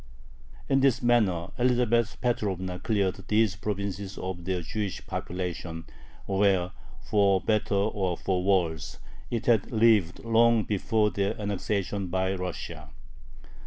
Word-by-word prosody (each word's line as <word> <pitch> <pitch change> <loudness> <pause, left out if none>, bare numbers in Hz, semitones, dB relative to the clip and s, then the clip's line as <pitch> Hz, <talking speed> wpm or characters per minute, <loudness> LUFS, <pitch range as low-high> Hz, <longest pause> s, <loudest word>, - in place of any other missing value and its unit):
In 135 - +3
this 130 -2 +2
manner 105 -9 +2
Elizabeth 120 -2 +2
Petrovna 95 -7 -1
cleared 100 -1 0
these 105 -2 +2
provinces 100 -1 -4
of 90 -2 -5
their 90 -2 -1
Jewish 100 +3 -4
population, 85 -2 -5 0.4
where 95 -2 +2 0.3
for 100 -2 +3
better 110 +1 0
or 100 -3 0
for 90 -2 -1
worse 85 -6 0 0.3
it 115 -2 -2
had 115 -5 +2
lived 110 -6 +3
long 115 0 +4
before 105 +1 +1
their 100 +1 -1
annexation 100 -1 -2
by 95 +1 0
Russia. 90 -1 -6
100 Hz, 120 wpm, -27 LUFS, 95-110 Hz, 0.4 s, long